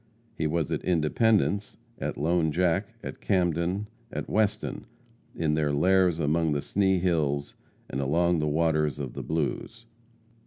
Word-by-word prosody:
He 80 - -1
was 80 0 -1
at - - -2
Independence; 100 +5 +1 0.2
at - - -3
Lone 80 +1 +1
Jack; 90 +6 0
at - - -7
Camden; 90 +1 0 0.3
at - - -4
Weston; 105 -1 -1 0.5
in 80 -2 0
their 75 -1 +1
lairs 90 +3 +3
among 80 0 +1
the 70 - 0
Sni 95 +1 +1
Hills, 75 -5 0 0.3
and 65 - -3
along 85 +5 +2
the 75 - 0
waters 75 -2 +1
of 70 -4 -5
the - - -5
Blues. 80 +9 -3
85 Hz, 145 wpm, -27 LUFS, 75-95 Hz, 0.5 s, lairs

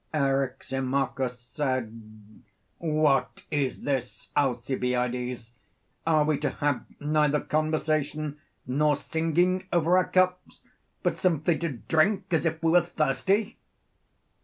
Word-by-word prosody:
Eryximachus 135 -1 -1
said: 115 -5 -5 0.4
What 155 -4 +1
is 140 -3 -1
this, 130 -3 -3
Alcibiades? 125 -2 -1 0.6
Are 155 -2 +4
we 150 -1 +1
to - - 0
have 145 -2 -1
neither 150 0 +2
conversation 155 -1 -1 0.3
nor 145 +4 +2
singing 175 +5 0
over 170 +1 +3
our 185 - -1
cups; 185 0 +1 0.4
but - - 0
simply 170 -3 +2
to 170 - -1
drink 185 - +1
as 165 +1 +2
if 160 0 -3
we 165 - +3
were 175 +1 +6
thirsty? 175 - 0
150 Hz, 110 wpm, -27 LUFS, 130-165 Hz, 0.6 s, were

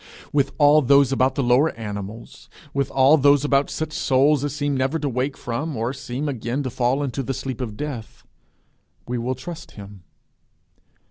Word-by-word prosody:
With 140 -1 +1
all 150 0 +6
those 140 0 +4
about 130 0 +2
the 140 - 0
lower 125 +6 +4
animals, 105 0 -8 0.2
with 140 -1 0
all 135 +4 +5
those 145 0 +4
about 140 -1 +2
such 155 -1 -4
souls 140 +2 +2
as 145 -1 -3
seem 145 -1 -1
never 135 +4 0
to 150 -2 -3
wake 130 +2 -2
from, 135 +4 -4
or 115 +4 -1
seem 130 +2 -5
again 130 +1 -3
to 130 - -4
fall 125 +4 0
into 135 0 -3
the 135 0 -3
sleep 130 -1 -5
of 110 -4 -5
death, 135 -7 -6 0.8
we 120 0 -2
will 125 +2 -2
trust 165 +6 -9
him. 100 -1 -11
135 Hz, 180 wpm, -22 LUFS, 120-145 Hz, 0.8 s, all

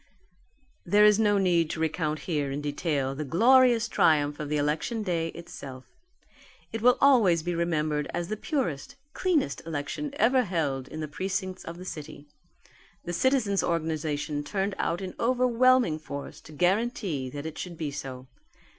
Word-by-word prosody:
There 205 +4 +5
is 210 0 +5
no 205 -2 +3
need 175 -4 +2
to 160 - -4
recount 155 -1 -1
here 150 -5 -1
in 135 +1 -3
detail 145 -2 -1
the 150 +3 -4
glorious 235 - +4
triumph 145 -2 +2
of 150 -1 -4
the 150 - 0
election 150 +10 -1
day 170 -4 -1
itself. 150 -7 -9 0.9
It 225 - -3
will 250 +2 +5
always 215 - +5
be 175 +1 -2
remembered 155 -3 -1
as 175 0 -3
the 215 - -2
purest, 215 - -3 0.2
cleanest 325 - 0
election 160 - -4
ever 255 +1 +4
held 145 - -2
in 155 +2 -7
the 155 - -3
precincts 185 +4 -4
of 165 +1 -8
the 180 - -9
city. 150 -3 -8 0.8
The 175 - -4
citizens' 230 -3 +2
organization 155 -3 -2
turned 195 +5 -2
out 170 +3 -1
in 185 -1 -5
overwhelming 250 -6 +3
force 140 -2 -8
to - - -14
guarantee 180 - 0
that 145 +3 -7
it 160 -1 -6
should 175 -2 -6
be 155 -3 -3
so. 130 -2 -7
170 Hz, 160 wpm, -27 LUFS, 150-210 Hz, 0.9 s, There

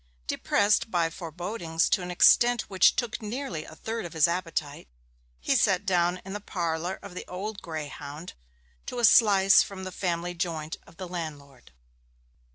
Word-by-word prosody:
Depressed 205 - +1
by 170 -4 +1
forebodings 170 0 -2
to - - +2
an 180 - -6
extent 240 +6 +5
which 190 -2 +3
took 240 -1 -2
away 210 - -6
nearly 215 - -4
a - - -12
third 225 0 -4
of 175 - -8
his 160 0 +4
appetite, 165 - -3 0.5
he 60 - +1
sat 190 +1 +2
down 180 -1 +1
in 195 - -7
the 205 - -4
parlour 175 -1 -3
of 200 - -9
the 180 - -6
Old 200 +3 -6
Greyhound 155 0 -7 0.5
to - - -5
a 240 - +4
slice 200 -3 +6
from 190 -1 -5
the 185 - -5
family 175 -1 -2
joint 165 -3 -3
of 165 - -18
the 185 - -6
landlord. 145 - -8
180 Hz, 165 wpm, -27 LUFS, 165-200 Hz, 0.5 s, slice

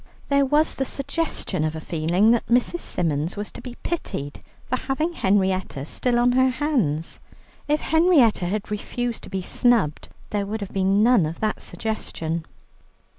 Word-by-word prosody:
There 280 -1 +3
was 300 +3 +3
the 270 - -1
suggestion 275 - -2
of 155 0 -1
a - - -4
feeling 170 +7 +2
that 235 - +1
Mrs. 250 +8 +2
Symons 165 - -2
was 205 0 -4
to - - -9
be 250 -2 -8
pitied 145 - -4 0.3
for 255 - 0
having 305 +6 -1
Henrietta 190 - 0
still 240 - 0
on 245 +1 +4
her 260 +1 +4
hands. 250 - -1 0.5
If 300 +1 +1
Henrietta 315 - +4
had 210 +3 -3
refused 240 +3 -3
to - - -10
be 190 -1 -3
snubbed, 220 -9 +1 0.2
there 205 -1 -1
would 220 +1 -4
have 200 - -6
been 195 +2 +3
none 230 -9 +5
of 160 +2 -6
that 215 -1 -1
suggestion. 170 -7 -4
215 Hz, 165 wpm, -24 LUFS, 180-260 Hz, 0.5 s, none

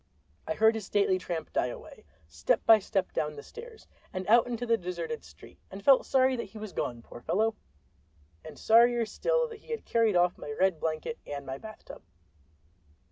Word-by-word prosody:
I 160 - -1
heard 220 +1 +5
his 220 -3 -5
stately 200 -2 +2
tramp 170 -3 -5
die - - +1
away, 125 - -10 0.2
step 80 +1 0
by 225 -1 +8
step 195 -1 -2
down 150 0 -2
the 145 - -9
stairs 460 -1 -12 0.3
and 185 0 -4
out 235 +3 +5
into 245 0 -3
the 230 -1 +3
deserted 180 +2 -5
street, - - -16
and 195 +1 -10
felt 270 -2 +5
sorry 260 0 +3
that 235 - -3
he 225 - -12
was 215 -3 -7
gone, 120 -1 -3
poor 120 - -12
fellow—and 80 - -5
sorrier 235 +1 +4
still - - 0
that 450 -2 -10
he - - -22
had 460 -1 -4
carried 225 -4 +2
off 175 0 +2
my - - -8
red 185 -3 +2
blanket 160 +9 -3
and 140 -1 -6
my 135 0 -6
bath 215 -1 -11
tub. - - -11
205 Hz, 190 wpm, -29 LUFS, 155-235 Hz, 0.3 s, by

